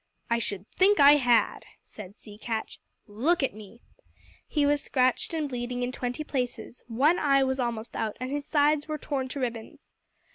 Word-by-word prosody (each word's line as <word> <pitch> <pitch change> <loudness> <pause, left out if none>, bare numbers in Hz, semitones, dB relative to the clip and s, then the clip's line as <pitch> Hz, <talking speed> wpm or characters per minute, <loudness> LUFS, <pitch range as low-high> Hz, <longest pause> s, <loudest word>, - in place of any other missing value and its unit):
"I 235 - +3
should 200 -3 -4
think 400 +2 +3
I 285 +1 +8
had," 245 -4 +2 0.2
said 205 -1 -12
Sea 210 -2 -13
Catch. 220 0 -4 0.3
"Look 270 +11 0
at 270 - 0
me!" 215 +2 -13 0.7
He 295 -2 +1
was 290 0 +2
scratched 255 -1 +1
and 315 -3 -2
bleeding 245 -1 -4
in 245 - -2
twenty 250 +3 -4
places; 250 -4 -4
one 275 +9 +2
eye 275 -2 +3
was 265 0 -1
almost 235 -2 -3
out, 220 -2 -3
and 255 +1 -4
his 290 0 -3
sides 295 0 +2
were 310 -1 -3
torn 275 -3 -3
to 275 - -5
ribbons. 235 -3 -6
255 Hz, 180 wpm, -27 LUFS, 235-290 Hz, 0.7 s, I